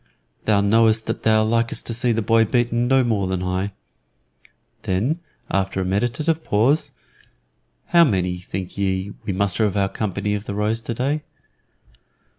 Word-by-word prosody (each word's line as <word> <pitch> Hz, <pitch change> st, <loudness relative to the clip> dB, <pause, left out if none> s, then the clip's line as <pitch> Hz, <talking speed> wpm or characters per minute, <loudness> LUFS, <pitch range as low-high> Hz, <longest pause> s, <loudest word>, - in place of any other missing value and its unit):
"Thou 105 Hz, -2 st, +3 dB
knowest 110 Hz, +2 st, +3 dB
that -, -, -3 dB
thou 110 Hz, -1 st, +3 dB
likest 115 Hz, +1 st, 0 dB
to 115 Hz, -, -3 dB
see 120 Hz, +1 st, 0 dB
the 115 Hz, -1 st, 0 dB
boy 115 Hz, +1 st, +4 dB
beaten 120 Hz, +1 st, +1 dB
no 135 Hz, 0 st, +4 dB
more 105 Hz, -5 st, 0 dB
than 95 Hz, -1 st, -2 dB
I." 95 Hz, +2 st, -2 dB, 1.1 s
Then, 115 Hz, -, 0 dB, 0.3 s
after 95 Hz, 0 st, 0 dB
a 95 Hz, -, -1 dB
meditative 120 Hz, -, 0 dB
pause, 125 Hz, +10 st, +2 dB, 1.0 s
"How 170 Hz, -1 st, +6 dB
many, 90 Hz, -, 0 dB
think 95 Hz, +1 st, -6 dB
ye, 95 Hz, 0 st, -1 dB
we -, -, -1 dB
muster 100 Hz, +2 st, +1 dB
of 105 Hz, -2 st, 0 dB
our 100 Hz, -1 st, +2 dB
company 105 Hz, 0 st, -2 dB
of 105 Hz, 0 st, -3 dB
the 100 Hz, -, -4 dB
Rose 105 Hz, +2 st, 0 dB
today?" 130 Hz, +7 st, -2 dB
110 Hz, 155 wpm, -22 LUFS, 95-120 Hz, 1.1 s, How